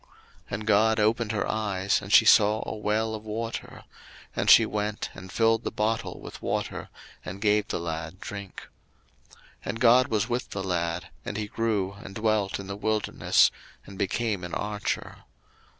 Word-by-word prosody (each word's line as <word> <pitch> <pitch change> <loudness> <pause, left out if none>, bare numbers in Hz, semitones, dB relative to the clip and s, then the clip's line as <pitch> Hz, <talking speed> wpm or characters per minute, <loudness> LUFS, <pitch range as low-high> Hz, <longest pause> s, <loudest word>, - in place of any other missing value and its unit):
01:021:019 - - -30 0.5
And 105 +2 -6
God 110 +1 +4
opened 110 +1 +2
her 105 - -1
eyes, 100 -3 0
and - - -8
she - - +8
saw 105 +1 +5
a - - -4
well 110 +1 0
of 110 -1 -6
water; 115 +2 -5 0.5
and - - 0
she - - +9
went, 105 +1 -3
and 95 0 -10
filled 115 0 +2
the - - -1
bottle 110 +1 -2
with - - -10
water, - - -3 0.3
and 95 +2 -7
gave 105 0 +2
the - - -2
lad 80 +1 -5
drink. 100 -2 -8 0.6
01:021:020 - - -22 0.2
And 115 - -3
God 125 +2 +6
was 110 -4 0
with 120 0 -2
the 95 - -4
lad; 85 -1 -2
and 105 - -5
he 105 - -2
grew, 105 -3 -1
and 95 - -10
dwelt 110 -3 0
in 100 - -7
the 100 +1 -5
wilderness, 110 +1 +2 0.3
and 100 -1 -11
became 105 0 -1
an 90 - -4
archer. 105 0 -3
105 Hz, 175 wpm, -27 LUFS, 95-110 Hz, 0.6 s, she